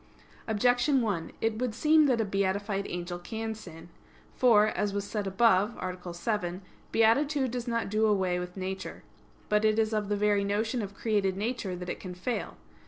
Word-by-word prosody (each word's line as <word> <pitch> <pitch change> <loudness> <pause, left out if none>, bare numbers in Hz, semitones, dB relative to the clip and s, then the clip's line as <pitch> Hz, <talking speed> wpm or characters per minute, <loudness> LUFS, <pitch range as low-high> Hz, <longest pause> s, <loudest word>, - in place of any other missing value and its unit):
Objection 245 +5 +3
1: 195 -7 -2
It 225 -1 0
would 245 -3 -1
seem 305 +3 +5
that 250 -4 +2
a 225 - +1
beatified 200 +1 -1
angel 175 0 -4
can 220 +4 -4
sin. 170 -6 -11 0.5
For, 225 -5 +5
as 205 -2 -1
as 200 - -1
said 205 0 -3
above 205 +1 +3
(A. 180 -1 -5
7), 180 -1 -2 0.3
beatitude 265 +4 +3
does 245 0 -4
not 230 -1 -1
do 215 +2 +2
away 190 -4 +1
with 180 +1 -7
nature. 190 0 -5 0.4
But 210 0 +2
it 215 0 +3
is 220 0 +1
of 210 -1 -1
the 205 - +1
very 205 -1 +2
notion 220 +4 0
of 200 -1 -6
created 200 -4 0
nature, 210 -3 -2
that 180 0 -7
it - - -4
can 180 -2 -7
fail. 235 +7 -3
210 Hz, 180 wpm, -29 LUFS, 190-225 Hz, 0.5 s, seem